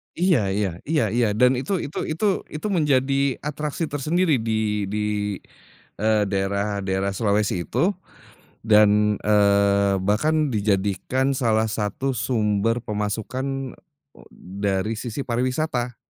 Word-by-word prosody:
Iya 175 -5 +3 0.2
iya 105 -1 0 0.2
iya 155 -5 +2
iya. 120 -2 +3
Dan 125 +3 +5
itu 140 +9 -3
itu 145 - -5
itu 160 +7 -2 0.2
itu 155 +7 -5
menjadi 140 -4 +2
atraksi 150 +2 -3
tersendiri 155 +2 +1
di 110 -2 -1
di 105 +2 -3 1.0
eee, 110 -1 +2
daerah 100 +1 -1
daerah 95 +1 -1
Sulawesi 100 -4 0
itu 180 +5 +1 0.7
dan, 105 -1 +4
eee, 100 -1 +3
bahkan 150 +10 +1
dijadikan 105 +5 0
salah 110 -2 +1
satu 105 +6 -2
sumber 115 0 0
pemasukan, 125 +6 -3 0.4
eee, - - -16
dari 100 +3 -2
sisi 120 +3 -4
pariwisata. 125 0 -1
110 Hz, 115 wpm, -23 LUFS, 105-135 Hz, 1.0 s, Dan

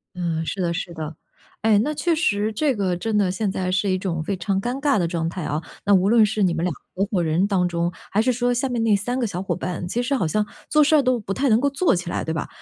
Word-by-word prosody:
嗯， 165 -2 -2
是 190 +3 -3
的， 170 - 0
是 175 0 -4
的。 160 -1 -6 0.5
哎， 215 -2 +4
那 295 +7 0
确 315 +4 0
实 215 -9 +1
这 280 +3 +1
个 190 -4 0
真 215 +4 -1
的 190 -3 +2
现 195 +1 -1
在 185 -1 -2
是 195 +2 +1
一 185 - +2
种 170 -4 -2
非 200 - -2
常 195 0 -1
尴 245 +4 -3
尬 280 -8 +3
的 170 - +1
状 165 -1 -2
态 175 -1 -5
啊， 150 +2 -2 0.2
那 200 - +4
无 190 0 +4
论 230 -1 +6
是 210 -1 0
你 180 - +2
们 165 0 -2
2 180 - +1
个 145 - -9 0.2
合 - - +2
伙 185 -6 0
人 165 +5 +1
当 185 -3 +1
中， 170 0 -1 0.2
还 210 - +3
是 255 +3 +2
说 245 0 +1
下 255 +3 0
面 240 -2 -1
那 220 -2 +4
3 245 +6 -2
个 250 - 0
小 185 -4 -3
伙 190 - -2
伴， 180 -1 -4
其 240 +6 -1
实 255 - -1
好 230 -11 +1
像 210 +6 0 0.2
做 305 0 +5
事 300 +2 +2
儿 300 - +6
都 255 -2 +1
不 195 -2 -4
太 270 +4 +1
能 220 - +5
够 280 +3 +2
做 280 - +2
起 175 0 -4
来， - - -2
对 160 - -3
吧？ 160 - -3
200 Hz, 310 characters per minute, -23 LUFS, 175-240 Hz, 0.5 s, 论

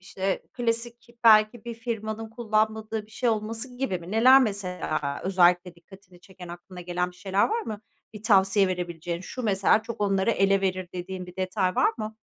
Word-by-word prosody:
işte 190 0 -3
klasik 235 0 -3
belki 215 +1 +5
bir 235 -1 -5
firmanın 225 -1 -5
kullanmadığı 220 -1 -1
bir - - -24
şey 245 +2 -1
olması 225 +3 -3
gibi 250 -9 -2
mi? 175 +2 -11
Neler 255 +5 +7
mesela 180 - -3
özellikle 180 -1 +3
dikkatini 180 +1 -18
çeken, 180 -1 -13
aklına 175 +1 -10
gelen 180 0 -2
bir 180 - -20
şeyler 195 +1 +1
var 455 +2 -1
mı? 215 - -6 0.3
Bir 210 - -9
tavsiye 195 -2 +4
verebileceğin 175 -1 -4
"Şu 250 +7 -7
mesela 200 0 +3
çok 230 +1 -8
onları 195 +1 +2
ele 195 -2 +2
verir." 185 -2 -2
dediğin 180 0 -6
bir 180 - -13
detay 185 0 -1
var - - +3
mı? 215 0 -5
200 Hz, 175 wpm, -26 LUFS, 180-225 Hz, 0.3 s, Neler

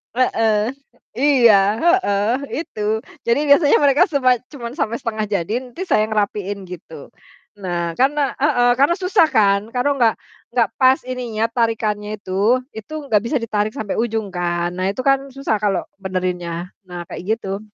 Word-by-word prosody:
Heeh. 225 -2 +1 0.4
Iya, 250 -5 +5 0.3
heeh, 215 - +2 0.3
itu. 215 -1 -3 0.2
Jadi 235 +5 +3
biasanya 285 +1 +6
mereka 285 +4 +5
cuma 255 -6 +2
cuma 240 -5 -6
sampai 230 -7 -1
setengah 220 -2 -3
jadi 200 0 -2 0.3
saya 215 0 +2
ngerapiin 205 -2 -2
gitu. 165 -5 -11 0.5
Nah 175 -3 -2
karena 280 +1 +2
heeh, 245 -4 +3
karena 290 +5 +4
susah 370 -2 +3
kan 200 -6 +3
kalau 275 +2 +1
nggak 225 -2 +4 0.4
nggak 230 -4 +3
pas 260 0 +5
ininya 240 -4 -2
tarikannya 215 -3 -1
itu. 205 +7 +1
Itu 220 +7 -9
nggak 210 -5 +3
bisa 285 +5 -2
ditarik 215 -1 -1
sampai 215 0 -3
ujung 220 -4 -2
kan. 175 0 -1
Nah 185 +1 -1
itu 255 +6 -5
kan 275 0 +4 0.2
susah 250 -6 -1
kalau 200 -3 +1 0.2
benerinnya. 180 -2 -3 0.2
Nah 175 -1 -6
kayak 215 +5 -2
gitu. 195 -2 -4
220 Hz, 150 wpm, -20 LUFS, 200-255 Hz, 0.5 s, biasanya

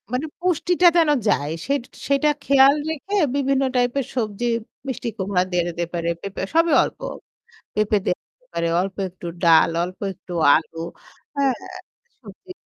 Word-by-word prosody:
মানে 255 +5 0
পুষ্টিটা 355 0 +2
যেন 325 -3 +4 0.2
যায় 145 +2 +1
সে 275 - 0 0.3
সেটা 280 +2 +3
খেয়াল 275 0 +6
রেখে 320 +6 -4 0.2
বিভিন্ন 275 -1 +1
type 245 0 +2
এর 270 - -2
সবজি, 220 -2 -2 0.4
মিষ্টি 260 -1 -4
কুমড়া 190 -1 +1
দেয়া 175 -1 +2
যেতে 170 0 -3
পারে, 170 -1 -1
পেঁপে 200 -1 -5
সবই 330 0 +4
অল্প। - - -6 0.8
পেঁপে 210 0 +2
দেওয়া 180 - 0
যেতে - - -35
পারে, 170 - 0
অল্প 190 +1 -3
একটু 175 0 -10 0.2
ডাল, 165 -1 +6
অল্প 180 +1 -5
একটু 180 0 -12 0.2
আলু, 165 +1 -1 0.6
অ্যাঁ 275 -2 +3 0.7
সবজি, 220 - -14
245 Hz, 150 wpm, -22 LUFS, 180-280 Hz, 0.8 s, খেয়াল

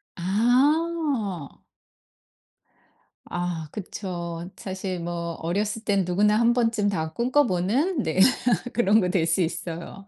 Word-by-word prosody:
아. 245 - +1 1.7
아 175 -3 -3
그쵸. 175 -3 -6
사실 185 -1 -4
뭐 170 0 -4
어렸을 205 +6 -2
땐 200 -2 +2
누구나 210 +4 +2
한 235 0 +4
번쯤 230 -4 +1
다 160 -4 -3
꿈꿔보는 250 - +1
네 160 +4 -1 0.5
그런 220 -2 +4
거 180 -3 0
될 180 -4 +1
수 165 +3 +2
있어요. 170 +3 -5
195 Hz, 185 characters per minute, -25 LUFS, 175-230 Hz, 1.7 s, 한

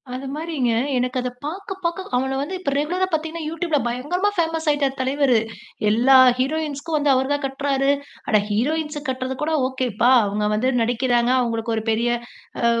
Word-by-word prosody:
அதுமாரிங்க, 275 0 -2 0.3
எனக்கு 250 +1 -1
அத 250 - -2 0.2
பாக்க 385 +5 -5
பாக்க 340 +2 -1 0.2
அவன 265 +1 0
வந்து 295 +7 -3
இப்ப 320 -6 -2
ரெகுலரா 350 +6 0
பாத்தீங்கன்னா, 320 +1 -2
யூடியூப்ல 330 -1 -1
பயங்கரமா 295 +12 0
ஃபேமஸ் 325 -1 -1
ஆயிட்டார் 280 -2 +1
தலைவரு. 265 -1 +2 0.5
எல்லா 240 +5 +4 0.2
ஹீரோயின்ஸ்க்கும் 305 +2 -2
வந்து 290 -1 +2
அவரு 260 0 +1
தான் 290 0 -2
கட்றாரு! 275 0 0 0.4
அட! 215 - +4
ஹீரோயின்ஸுக்கு 300 +7 -1
கட்றதுகூட 260 +4 -2 0.2
ஓகேப்பா! 250 -3 0 0.2
அவுங்க 210 +1 -1
வந்து 230 +5 +1
நடிக்கிறாங்க, 240 +1 +1
அவுங்களுக்கு 230 -1 -2
ஒரு 220 - -2
பெரிய 230 +2 +1 0.5
அ - - +3
270 Hz, 150 wpm, -22 LUFS, 250-315 Hz, 0.5 s, எல்லா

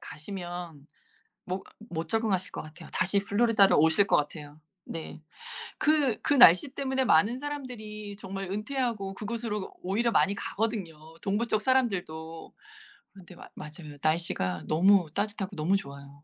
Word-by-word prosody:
가시면 175 -3 -7 0.6
못 185 +1 -4 0.3
못 165 -1 -4
적응하실 215 -5 0
것 - - -5
같아요. 160 +2 -12
다시 200 +2 +2
플로리다로 205 -1 +4
오실 160 +6 +4
것 - - +4
같아요. 150 0 -4 0.2
네. 160 -1 -7 0.6
그 295 -7 +2
그 - - +2
날씨 240 -1 +8
때문에 265 -1 -1
많은 225 +7 +4
사람들이 225 -8 -6
정말 195 -1 -6
은퇴하고 215 -2 -2
그곳으로 215 -1 -4
오히려 225 +6 0
많이 200 -1 +3
가거든요 205 -6 -3 0.3
동부 210 +4 0
쪽 215 -1 +1
사람들도. 180 -11 -1 0.6
그런데 185 -2 -14
마 - - -12
맞아요. 150 -1 -9
날씨가 155 - 0
너무 175 +1 +4
따뜻하고 205 0 -2
너무 165 +5 +2
좋아요. 140 -3 -10
195 Hz, 320 characters per minute, -28 LUFS, 160-225 Hz, 0.6 s, 날씨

